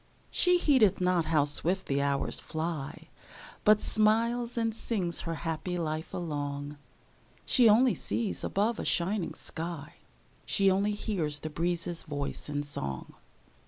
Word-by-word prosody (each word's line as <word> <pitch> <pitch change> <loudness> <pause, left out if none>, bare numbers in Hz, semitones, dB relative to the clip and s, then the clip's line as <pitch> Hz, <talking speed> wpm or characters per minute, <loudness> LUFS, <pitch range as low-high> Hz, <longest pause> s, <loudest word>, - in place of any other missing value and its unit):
She 360 -1 +4
heedeth 260 - +4
not 180 -2 +2
how 155 -3 +3
swift 175 +6 +1
the 140 0 0
hours 140 -1 -1
fly, 160 -2 -5 0.5
But 210 0 +5
smiles 230 +3 +2
and 225 -1 +1
sings 195 -6 -2
her 165 - -1
happy 165 +2 -2
life 160 -1 -3
along; 145 -3 -4 0.7
She 240 -3 +5
only 235 +4 +5
sees 225 -4 -3
above 215 +3 0
a - - -2
shining 185 +2 0
sky; 165 -3 -6 0.5
She 195 -2 +3
only 200 +2 +1
hears 170 -9 -2
the 155 - -5
breezes' 170 +1 -2
voice 145 -1 -5
in 145 0 -2
song. 70 - -4
175 Hz, 135 wpm, -30 LUFS, 150-215 Hz, 0.7 s, But